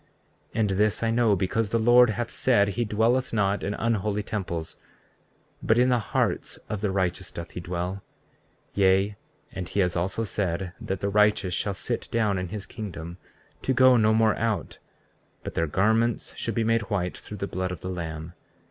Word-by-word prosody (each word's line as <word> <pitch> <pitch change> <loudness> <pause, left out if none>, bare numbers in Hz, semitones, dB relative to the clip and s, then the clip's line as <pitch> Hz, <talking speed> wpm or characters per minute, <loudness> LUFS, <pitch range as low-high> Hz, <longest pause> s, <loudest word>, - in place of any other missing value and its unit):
34:36 - - -1
And 105 -2 +2
this 105 +3 +1
I 115 - +2
know, 115 -3 +3
because 100 +4 0
the 115 - +1
Lord 120 +2 +6
hath 120 +2 -2
said 100 -6 +3
he 120 +4 -1
dwelleth 115 +5 +1
not 100 -2 +1
in 100 +2 -2
unholy 105 -2 0
temples, 85 -6 -4 0.8
but 110 - +2
in 125 +1 +4
the 125 -1 +3
hearts 110 - -1
of 105 -2 -4
the 105 - 0
righteous 95 -1 -1
doth 85 0 -7
he - - -6
dwell; 90 +2 -4 0.7
yea, 95 +1 +3 0.4
and 90 -2 -6
he - - -2
has 90 -3 +2
also 95 +6 -1
said 95 -3 -2
that 95 -1 -3
the 100 - 0
righteous 105 -2 +3
shall 100 +3 -1
sit - - -3
down 105 -4 +1
in 90 - -3
his 100 +2 -6
kingdom, 90 -6 -7 0.4
to 130 - 0
go 130 0 +7
no 110 -2 +4
more 110 -1 +3
out; 115 -2 -2 0.6
but - - -5
their 80 - 0
garments 110 +7 +1
should - - -3
be 115 - +1
made 115 0 +1
white 90 -4 -1
through 105 - -9
the 100 - -2
blood 95 -1 -3
of 90 - -7
the 95 - -5
Lamb. 80 -2 -5
100 Hz, 190 wpm, -26 LUFS, 95-110 Hz, 0.8 s, go